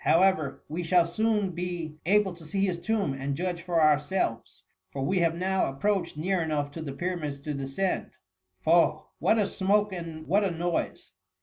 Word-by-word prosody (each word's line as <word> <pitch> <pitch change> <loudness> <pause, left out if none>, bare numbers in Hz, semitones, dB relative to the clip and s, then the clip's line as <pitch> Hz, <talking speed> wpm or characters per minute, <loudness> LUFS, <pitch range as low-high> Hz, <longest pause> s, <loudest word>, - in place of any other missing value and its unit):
However, 170 -5 +3
we 165 +4 -3
shall 175 0 +4
soon 210 +2 0
be 170 -3 -4
able 200 -1 +3
to 170 -1 -13
see 195 +6 0
his 180 -3 -1
tomb, 205 -6 0
and 135 +1 -3
judge 175 0 -2
for 170 -1 0
ourselves; 150 -4 +1 0.3
for 135 +4 -4
we 185 +6 +1
have 165 -1 +2
now 190 +1 +1
approached 170 +4 -1
near 180 +3 0
enough 150 -3 -1
to 165 - -7
the 150 -3 -4
Pyramids 160 -2 -3
to 150 +1 -4
descend. 140 +7 -2 0.5
Fob! 165 -1 +4 0.2
what 220 - +3
a 210 - +3
smoke 205 +1 +1
and 165 -3 -6
what 200 +6 +3
a 195 - +2
noise 170 0 -2
170 Hz, 180 wpm, -28 LUFS, 155-190 Hz, 0.5 s, shall